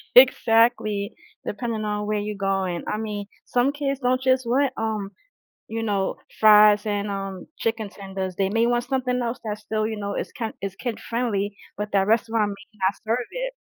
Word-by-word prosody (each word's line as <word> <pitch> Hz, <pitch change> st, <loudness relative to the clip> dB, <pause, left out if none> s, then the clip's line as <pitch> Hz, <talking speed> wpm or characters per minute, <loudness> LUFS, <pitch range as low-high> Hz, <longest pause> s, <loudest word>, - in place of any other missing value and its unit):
exactly, 225 Hz, -4 st, +5 dB, 0.3 s
depending 225 Hz, 0 st, -3 dB
on 210 Hz, 0 st, -1 dB
where 210 Hz, 0 st, 0 dB
you're 210 Hz, 0 st, -3 dB
going. 195 Hz, -3 st, -1 dB
I 210 Hz, -, -1 dB
mean, 210 Hz, -2 st, -4 dB, 0.2 s
some 250 Hz, +3 st, +2 dB
kids 275 Hz, -2 st, -2 dB
don't 255 Hz, 0 st, +1 dB
just 260 Hz, -1 st, +3 dB
want, 260 Hz, +3 st, +2 dB
um, 215 Hz, -3 st, -2 dB, 0.6 s
you 225 Hz, 0 st, -2 dB
know, 200 Hz, -3 st, 0 dB, 0.2 s
fries 210 Hz, -1 st, +7 dB
and, 205 Hz, -1 st, -1 dB
um, 195 Hz, -2 st, -5 dB
chicken 225 Hz, -2 st, -1 dB
tenders. 190 Hz, -2 st, -5 dB
They 195 Hz, -1 st, +1 dB
may 225 Hz, +2 st, +2 dB
want 240 Hz, 0 st, +2 dB
something 250 Hz, -1 st, 0 dB
else 235 Hz, +1 st, -2 dB
that's 210 Hz, -1 st, -4 dB
still, 215 Hz, 0 st, -1 dB
you 220 Hz, -, -3 dB
know, 200 Hz, -1 st, -3 dB
is -, -, -3 dB
kin 225 Hz, -4 st, -4 dB
is 195 Hz, -1 st, -4 dB
kid 240 Hz, 0 st, -4 dB
friendly, 210 Hz, -4 st, -1 dB, 0.2 s
but 210 Hz, +1 st, -3 dB
that 195 Hz, -1 st, +3 dB
restaurant 225 Hz, -1 st, +2 dB
may 210 Hz, +1 st, -11 dB
not 195 Hz, -, +2 dB
serve 235 Hz, +2 st, 0 dB
it. -, -, -3 dB
215 Hz, 185 wpm, -24 LUFS, 205-240 Hz, 0.6 s, fries